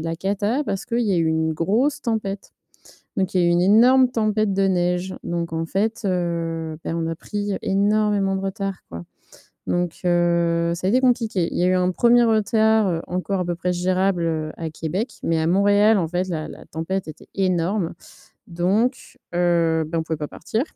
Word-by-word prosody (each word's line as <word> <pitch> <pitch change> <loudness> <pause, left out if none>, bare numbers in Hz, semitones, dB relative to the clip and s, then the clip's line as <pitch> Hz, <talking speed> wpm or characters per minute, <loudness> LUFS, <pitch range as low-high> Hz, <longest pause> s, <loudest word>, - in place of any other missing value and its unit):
la 165 +1 -3
cata 205 - -1
parce 195 -7 -3
qu'il 235 +1 -1
y 210 -5 +1
a - - +2
eu 165 - +1
une 160 0 +1
grosse 230 - 0
tempête. 205 -4 -3 0.6
Donc 190 -2 -1
il 185 - +3
y - - +3
a - - +3
eu - - +3
une 175 +1 +3
énorme 250 +6 +5
tempête 215 -3 0
de 195 0 +2
neige, 180 0 0
donc 170 -1 -3
en 165 0 -2
fait, 210 +6 -1
heu, 165 -3 -2
bah, - - -3
on 165 -1 -2
a 165 - -3
pris 205 +2 -3
énormément 200 -1 +1
de 190 - -4
retard, 195 0 -3
quoi. 85 0 -7 0.6
Donc, 175 -1 -2
heu, 170 -1 +2
ça 185 +2 -4
a - - +3
été 250 +4 +3
compliqué. 230 -8 +1
Il - - -3
y - - +1
a - - +4
eu 185 - +3
un 180 0 +1
1er 240 +4 +4
retard, 220 -1 +3
heu, 165 -2 -1
encore 185 +2 -2
à - - -1
peu 175 - -1
près 180 +1 -1
gérable, 185 +1 0
heu, 155 -1 -2
à 165 -1 -3
Québec, 170 - -3
mais 165 -1 +1
à 160 - 0
Montréal 205 +4 +4
en 170 -3 -1
fait 180 +2 -1
la-la 155 -3 -5
tempête 180 +4 -4
était 155 - -11
énorme 185 -1 0 0.6
donc, 195 +9 -1 0.2
heu, 170 -2 +2
bah, 165 +1 -2
on - - 0
pouvait 160 0 -3
pas 150 - -4
partir, 220 +8 -3
185 Hz, 200 wpm, -22 LUFS, 170-205 Hz, 0.6 s, énorme